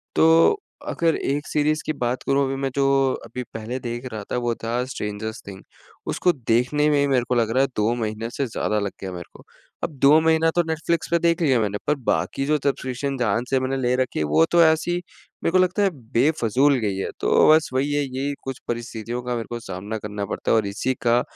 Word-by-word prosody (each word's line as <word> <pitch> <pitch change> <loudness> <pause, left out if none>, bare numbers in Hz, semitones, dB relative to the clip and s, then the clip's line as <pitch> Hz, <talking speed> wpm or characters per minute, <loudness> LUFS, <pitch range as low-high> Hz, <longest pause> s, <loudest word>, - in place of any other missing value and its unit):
तो 165 - +5 0.3
अगर 165 -1 +1
1 145 +1 -2
सीरीज़ 155 +1 +1
की 155 - -1
बात 125 +1 -2
करूँ 140 0 +2
अभी 135 0 -2
मैं 135 - 0
जो 140 -1 +2 0.4
अभी 125 - -6
पहले 115 +3 -4
देख 120 +1 -5
रहा 105 -2 -5
था - - 0
वो 120 -1 0
था 120 +2 -1
स्ट्रेंजरस 110 -3 -5
थिंग। 95 -1 -9 0.5
उसको 180 - +2 0.2
देखने 130 +6 +2
में 145 - +3
ही 140 - +2
मेरे 130 -3 +2
को 125 - +2
लग 115 -2 +1
रहा 130 - +4
है 135 - +1
2 105 +3 +1
महीने 110 0 -3
से 140 - -2
ज़्यादा 105 -1 -1
लग 100 -1 -2
गया 95 -1 -5
मेरे 90 -1 -6
को। - - -15 0.4
अब - - 0
2 145 +3 +6
महीना 160 0 +3
तो 175 - +3
नेटफ्लिक्स 165 +1 -1
पे 170 - +3
देख 170 +1 +1
लिया 135 -6 +3
मैंने 105 -1 -1
पर 150 - +3
बाकी 135 - 0
जो 150 +1 +2
सब्सक्रिप्शन 135 -1 -2
जहाँ 115 -2 +1
से 135 - +2
मैंने 130 +1 -1
ले 125 -1 +1
रखी 130 -1 -1
हैं 75 - +1
वो 75 +2 +4
तो 170 -1 +6
ऐसी 160 +2 +2 0.5
मेरे - - +1
को 185 - +4
लगता 185 +2 +2
है 200 - +4 0.2
बेफ़िज़ूल 135 +1 +3
गई 100 -3 -1
हैं। 95 - -2
तो - - +4
बस 155 0 +4
वही 140 +3 0
है 145 0 +1
यही 135 +2 -3
कुछ 135 -1 -5
परिस्थितियों 120 0 -4
का 125 0 -2
मेरे 115 - -3
को 120 0 -4
सामना 100 +2 -6
करना 105 -1 -4
पड़ता 100 - -2
है - - +5
और 105 -2 +1
इसी 115 +6 -1
का 120 +1 +4
130 Hz, 230 wpm, -23 LUFS, 115-150 Hz, 0.5 s, 2